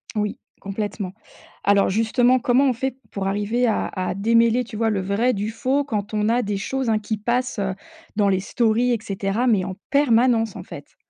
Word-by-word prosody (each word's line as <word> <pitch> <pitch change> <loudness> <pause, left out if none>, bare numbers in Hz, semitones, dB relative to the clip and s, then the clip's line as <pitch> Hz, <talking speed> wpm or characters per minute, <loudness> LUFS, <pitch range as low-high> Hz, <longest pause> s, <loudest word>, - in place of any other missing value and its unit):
Oui, 210 -1 -1 0.2
complètement. 200 -1 -4 0.5
Alors 200 0 +4
justement, 235 +5 +3
comment 255 +3 +3
on - - +2
fait 260 +2 -3
pour 195 -1 -3
arriver 210 +5 0
à 220 - +1
à 185 -1 -2
démêler, 230 +3 +3
tu 230 -2 -10
vois, 225 +1 +1
le 205 -3 0
vrai 205 +7 +1
du 205 +1 -2
faux 265 +5 0
quand 210 -5 -3
on 210 0 +1
a 235 +2 +2
des 205 -3 -2
choses, 265 +5 -2
hein, 220 -1 +2
qui 215 +1 -3
passent, 240 +2 -1
heu, 195 -1 -1 0.4
dans 205 -2 +2
les 190 -1 +2
stories 235 +4 +1
et 240 - +2
cetera 200 +3 -1
mais 210 -6 +3
en 185 0 -5
permanence, 240 -5 +3
en - - -7
fait? - - -11
220 Hz, 200 wpm, -22 LUFS, 200-245 Hz, 0.5 s, Alors